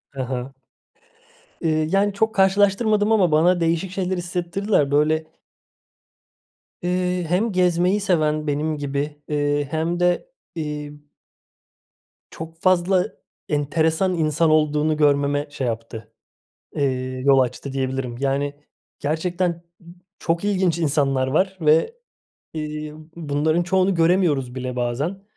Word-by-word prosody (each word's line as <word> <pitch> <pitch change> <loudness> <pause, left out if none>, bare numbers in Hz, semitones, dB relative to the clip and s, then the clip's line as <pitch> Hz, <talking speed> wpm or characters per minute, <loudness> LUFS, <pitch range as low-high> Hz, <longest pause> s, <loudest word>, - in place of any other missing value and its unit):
He 135 - -3
he. 125 -1 -3 1.2
İii, 155 -1 +1
yani, 200 +2 +2
çok 220 +2 0
karşılaştırmadım 205 +2 +3
ama 185 -7 +3
bana 175 +4 +4
değişik 165 +2 0
şeyler 185 0 -2
hissettirdiler. 175 -1 -1
Böyle 155 +2 +2 1.6
eee, 180 0 0
hem 200 +6 +1
gezmeyi 180 +2 +2
seven 155 -6 +1
benim 150 +2 -1
gibi, 145 +1 -4
eee, 145 -1 0
hem 165 +2 -1
de, 180 - +1 0.3
iii 150 -1 -6 1.2
çok 165 +1 -9
fazla 185 0 +3 0.4
enteresan 160 +5 +1
insan 160 0 +2
olduğunu 155 0 +2
görmeme 145 0 +2
şey 135 -3 -3
yaptı, 115 -1 -6 0.7
eee, 130 -2 -1
yol 140 -1 +5
açtı, 130 +2 -1
diyebilirim. 130 -2 -3
Yani, 140 +1 -1 0.5
gerçekten 170 +3 -1 0.6
çok 170 +3 -1
ilginç 185 -4 +1
insanlar 140 -4 +1
var 190 +8 0
ve, 160 - +3 0.6
iii, 150 -1 -5 0.2
bunların 155 +1 0
çoğunu 190 +2 +2
göremiyoruz 165 -7 +2
bile 130 -1 -4
bazen. 135 +11 -2
155 Hz, 110 wpm, -22 LUFS, 145-180 Hz, 1.6 s, yol